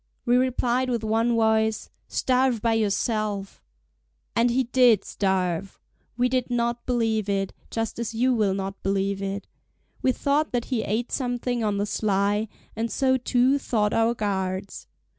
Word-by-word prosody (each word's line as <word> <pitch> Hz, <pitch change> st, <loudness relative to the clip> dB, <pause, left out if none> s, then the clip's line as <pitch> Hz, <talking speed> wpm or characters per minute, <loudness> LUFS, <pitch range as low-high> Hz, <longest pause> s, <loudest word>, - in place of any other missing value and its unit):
We 245 Hz, 0 st, +3 dB
replied 255 Hz, 0 st, +1 dB
with 235 Hz, -3 st, -1 dB
one 225 Hz, +2 st, +1 dB
voice: 220 Hz, -1 st, +1 dB, 0.2 s
"Starve 255 Hz, -2 st, +1 dB
by 230 Hz, +1 st, +1 dB
yourself!" 210 Hz, -1 st, -1 dB, 0.7 s
And 235 Hz, +1 st, +3 dB
he 255 Hz, +2 st, +2 dB
did 240 Hz, -4 st, +4 dB
starve! 190 Hz, -1 st, -1 dB, 0.4 s
We 250 Hz, 0 st, +3 dB
did 255 Hz, -1 st, -1 dB
not 235 Hz, 0 st, -1 dB
believe 225 Hz, -4 st, 0 dB
it, 195 Hz, -1 st, -1 dB, 0.2 s
just 225 Hz, 0 st, -3 dB
as 235 Hz, -1 st, -2 dB
you 250 Hz, +3 st, +2 dB
will 210 Hz, -5 st, +1 dB
not 195 Hz, 0 st, -5 dB
believe 195 Hz, 0 st, -1 dB
it: 195 Hz, 0 st, -3 dB, 0.6 s
we 260 Hz, -, +3 dB
thought 285 Hz, +3 st, 0 dB
that 240 Hz, -1 st, 0 dB
he 230 Hz, -, +1 dB
ate 225 Hz, +4 st, -2 dB
something 245 Hz, -2 st, -1 dB
on 205 Hz, -2 st, 0 dB
the 200 Hz, -, 0 dB
sly, 205 Hz, +1 st, 0 dB, 0.3 s
and 225 Hz, +1 st, -2 dB
so 260 Hz, -1 st, +2 dB
too 255 Hz, +2 st, +2 dB
thought 210 Hz, -6 st, 0 dB
our 225 Hz, +1 st, +2 dB
guards. 190 Hz, -2 st, -3 dB
225 Hz, 155 wpm, -25 LUFS, 200-245 Hz, 0.7 s, did